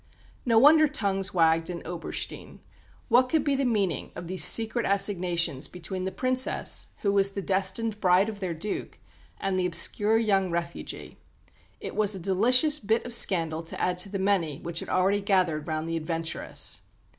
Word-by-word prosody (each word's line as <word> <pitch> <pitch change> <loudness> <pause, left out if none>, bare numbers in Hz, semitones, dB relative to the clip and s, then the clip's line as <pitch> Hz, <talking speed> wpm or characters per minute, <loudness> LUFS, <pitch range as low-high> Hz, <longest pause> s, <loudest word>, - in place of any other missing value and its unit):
No 230 -2 +3
wonder 305 +5 +6
tongues 200 -9 -2
wagged 165 -1 +2
in 175 -1 -7
Oberstein. 170 0 -6 0.5
What 255 +1 +3
could 315 -1 +1
be 285 - 0
the 270 0 -1
meaning 205 -8 -1
of 175 - -7
these 180 -1 +3
secret 230 +6 +5
assignations 180 -8 +1
between 185 +1 -6
the 190 - -3
Princess, 255 +2 -1 0.2
who 200 - +2
was 195 -1 +2
the 200 0 -6
destined 195 +3 0
bride 185 +1 +3
of 215 -2 -6
their 180 -4 -4
Duke, 200 +6 -5 0.4
and 190 -1 -1
the 180 - +1
obscure 205 +5 +2
young 195 -4 +1
refugee? 170 0 -6 0.6
It - - -7
was 210 -1 +2
a - - -7
delicious 250 - +3
bit 220 +2 -1
of 240 - -6
scandal 165 -7 +2
to 165 - -6
add 180 0 -1
to 195 - -1
the 195 - -4
many 190 -7 0
which 170 0 -3
had - - -7
already 195 +2 +1
gathered 180 -7 0
round 155 0 -3
the 165 0 -2
"adventuress." 165 0 -3
190 Hz, 175 wpm, -26 LUFS, 170-220 Hz, 0.6 s, wonder